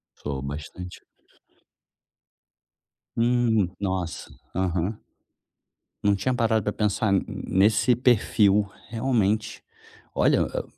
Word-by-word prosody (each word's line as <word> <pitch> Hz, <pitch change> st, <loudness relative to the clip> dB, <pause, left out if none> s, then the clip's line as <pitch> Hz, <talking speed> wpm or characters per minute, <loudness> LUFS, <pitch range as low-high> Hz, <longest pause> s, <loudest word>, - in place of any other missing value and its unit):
Soou 70 Hz, -2 st, -5 dB
bastante 75 Hz, +6 st, -7 dB, 2.2 s
Hum, 115 Hz, -6 st, +2 dB
nossa! 95 Hz, -4 st, -3 dB, 0.2 s
Aham. 95 Hz, +3 st, -1 dB, 1.1 s
Não 100 Hz, 0 st, +4 dB
tinha 130 Hz, +6 st, -1 dB
parado 115 Hz, -3 st, +1 dB
pra 105 Hz, -, -1 dB
pensar 105 Hz, -1 st, 0 dB
hum, 95 Hz, -, +3 dB
nesse 110 Hz, +5 st, +2 dB
perfil 105 Hz, -4 st, +3 dB, 0.2 s
realmente. 110 Hz, -3 st, 0 dB, 0.5 s
Olha, -, -, +3 dB
eh -, -, -2 dB
105 Hz, 90 wpm, -25 LUFS, 95-115 Hz, 2.2 s, Não